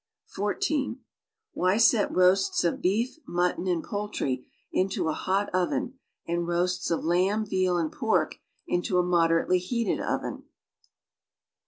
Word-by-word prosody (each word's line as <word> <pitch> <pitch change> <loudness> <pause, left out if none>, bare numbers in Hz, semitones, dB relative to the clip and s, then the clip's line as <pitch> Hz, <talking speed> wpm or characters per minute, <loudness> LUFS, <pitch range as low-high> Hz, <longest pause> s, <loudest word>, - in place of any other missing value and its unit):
(14) 265 +6 -1 0.5
Why 185 +3 +2
set 225 -1 +4
roasts 185 +1 +3
of 170 - 0
beef, 225 - 0
mutton 175 +1 0
and 175 -3 0
poultry 205 -11 -3 0.2
into 185 -3 0
a - - 0
hot 195 +2 0
oven 185 +8 -1 0.3
and 170 0 -1
roasts 175 +1 0
of 165 - -1
lamb, 190 +6 +2
veal 185 -3 +1
and 165 -2 -1
pork 185 -10 0 0.3
into 175 +1 0
a 180 - +4
uujderately 170 0 +3
heated 230 +5 -1
oven. - - -3
185 Hz, 130 wpm, -27 LUFS, 175-205 Hz, 0.5 s, set